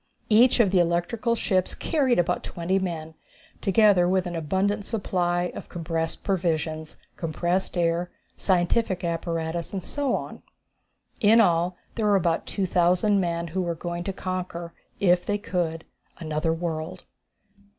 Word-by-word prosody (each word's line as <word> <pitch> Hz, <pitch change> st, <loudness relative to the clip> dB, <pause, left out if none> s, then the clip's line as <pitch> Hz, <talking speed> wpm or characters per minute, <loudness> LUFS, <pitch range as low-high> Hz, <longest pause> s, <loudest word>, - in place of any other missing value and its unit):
Each 240 Hz, +4 st, +5 dB
of 205 Hz, -6 st, +4 dB
the 190 Hz, -, +4 dB
electrical 175 Hz, +8 st, +1 dB
ships 185 Hz, -5 st, 0 dB
carried 270 Hz, -6 st, +1 dB
about 175 Hz, 0 st, +1 dB
twenty 175 Hz, +3 st, -1 dB
men, 165 Hz, -4 st, -4 dB, 0.5 s
together 195 Hz, -3 st, +4 dB
with 185 Hz, 0 st, +2 dB
an 175 Hz, -1 st, -4 dB
abundant 190 Hz, +6 st, 0 dB
supply 180 Hz, -5 st, -1 dB
of -, -, -8 dB
compressed 165 Hz, -1 st, -3 dB
provisions, 160 Hz, -4 st, -1 dB, 0.2 s
compressed 175 Hz, +3 st, -1 dB
air, 170 Hz, +1 st, +1 dB, 0.3 s
scientific 185 Hz, +1 st, +1 dB
apparatus 165 Hz, 0 st, -2 dB
and 190 Hz, -3 st, -3 dB
so 280 Hz, +5 st, -1 dB
on. -, -, -6 dB, 0.8 s
In 220 Hz, +2 st, +6 dB
all, 175 Hz, -3 st, +3 dB, 0.2 s
there 220 Hz, -2 st, 0 dB
were 205 Hz, -, +4 dB
about 170 Hz, -3 st, +1 dB
2,000 185 Hz, +1 st, +2 dB
men, 170 Hz, -2 st, -1 dB
who 185 Hz, +4 st, -1 dB
were 170 Hz, -2 st, -2 dB
going 175 Hz, +1 st, -4 dB
to 195 Hz, -, -1 dB
conquer, 180 Hz, -2 st, -5 dB, 0.3 s
if 180 Hz, -2 st, +4 dB
they 205 Hz, -, 0 dB
could, 170 Hz, -5 st, -2 dB, 0.3 s
another 155 Hz, 0 st, -1 dB
world! 165 Hz, +1 st, -4 dB
175 Hz, 140 wpm, -25 LUFS, 170-195 Hz, 0.8 s, In